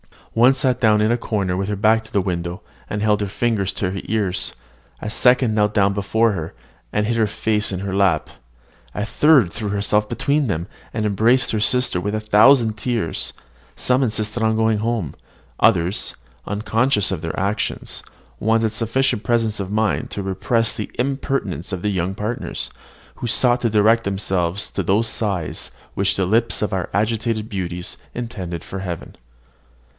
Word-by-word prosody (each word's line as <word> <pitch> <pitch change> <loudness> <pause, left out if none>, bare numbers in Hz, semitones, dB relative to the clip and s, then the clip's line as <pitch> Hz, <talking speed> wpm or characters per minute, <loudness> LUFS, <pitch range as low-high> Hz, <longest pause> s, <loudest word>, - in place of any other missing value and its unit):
One 120 +4 +5
sagaciously 130 -1 +2
sat 125 - -19
down 105 -2 +4
in 110 +2 +3
a 120 - +2
corner 100 -6 -1
with 95 +1 -2
her 105 - -1
back 110 +2 +3
to 110 - -14
the 100 - +2
window, 90 -2 -3 0.3
and 105 0 -2
held 105 -1 +2
her 100 - -1
fingers 105 -2 0
to 90 - -2
her 95 - -4
ears; 100 -4 0 0.4
a 105 - -4
second 125 -1 +4
knelt 105 -1 +2
down 100 -1 +3
before 110 +3 +2
her, 85 -4 -4 0.4
and 105 0 +1
hid 115 +1 0
her 110 -2 +3
face 105 0 0
in 95 -1 -3
her 100 -1 -3
lap; 95 -5 +2 0.7
a 105 - -1
third 135 - +4
threw 105 -3 -4
herself 105 +1 +1
between 140 +4 +1
them, 85 -4 -2 0.3
and 110 - -1
embraced 115 +5 +3
her 110 - 0
sister 125 -3 +2
with 105 +3 -2
a 110 - -2
thousand 110 +1 +5
tears; 115 -7 -1 0.4
some 125 +1 +2
insisted 110 -2 -1
on 110 0 +2
going 110 -1 +2
home; 110 - -2 0.5
others, 90 -3 +2 0.3
unconscious 110 +2 +1
of 90 -5 -3
their 80 -1 -4
actions, 100 +3 -2 0.4
wanted 110 0 +2
sufficient 115 +1 0
presence 115 -3 +1
of 95 -2 -3
mind 110 0 0
to 100 - -4
repress 115 +4 +1
the 105 - -5
impertinence 125 - -2
of 90 - -3
their 105 - +1
young 95 0 -1
partners, 105 +4 -4 0.4
who 120 - -5
sought 120 +1 +3
to 115 - +1
direct 110 +2 +3
to - - +1
themselves 95 -1 -1
those 110 +4 +1
sighs 95 -7 -2 0.2
which 100 0 +1
the 95 - 0
lips 115 +5 +1
of 105 - 0
our 95 -3 -2
agitated 110 +1 -1
beauties 90 -3 -4 0.2
intended 95 -8 -5
for 95 - -6
heaven. 90 -3 -6
105 Hz, 175 wpm, -21 LUFS, 95-115 Hz, 0.7 s, One